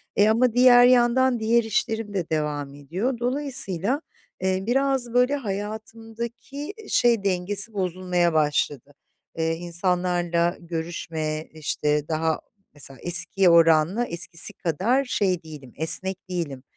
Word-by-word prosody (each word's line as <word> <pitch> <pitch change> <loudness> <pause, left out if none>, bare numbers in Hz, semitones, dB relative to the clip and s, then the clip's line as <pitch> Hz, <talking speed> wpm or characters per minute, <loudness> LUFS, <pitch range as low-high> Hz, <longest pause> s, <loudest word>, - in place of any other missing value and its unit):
E 205 +1 +4
ama 230 +1 +2
diğer 245 0 +7
yandan 250 0 +3
diğer 230 +2 +2
işlerim 220 -1 -2
de 185 -4 -3
devam 150 -3 -2
ediyor. 185 - -3
Dolayısıyla, 255 - -1 0.4
eee, 190 0 0
biraz 265 -1 0
böyle 250 +3 +3
hayatımdaki 225 - -6 0.2
şey 235 -4 +3
dengesi 200 +3 0
bozulmaya 180 -2 0
başladı. 145 -2 0 0.4
Eee, 160 0 0
insanlarla 175 0 -1
görüşme, 160 -2 -4
işte, 150 -1 -1
daha 160 0 -1 0.3
mesela 135 -2 -8
eskiye 175 +2 +4
oranla 165 +6 +4
eskisi 170 -3 -1
kadar 205 - 0
şey 190 -8 0
değilim, 150 -6 -12
esnek 185 +4 0
değilim, 155 -8 -4
185 Hz, 115 wpm, -24 LUFS, 165-235 Hz, 0.4 s, diğer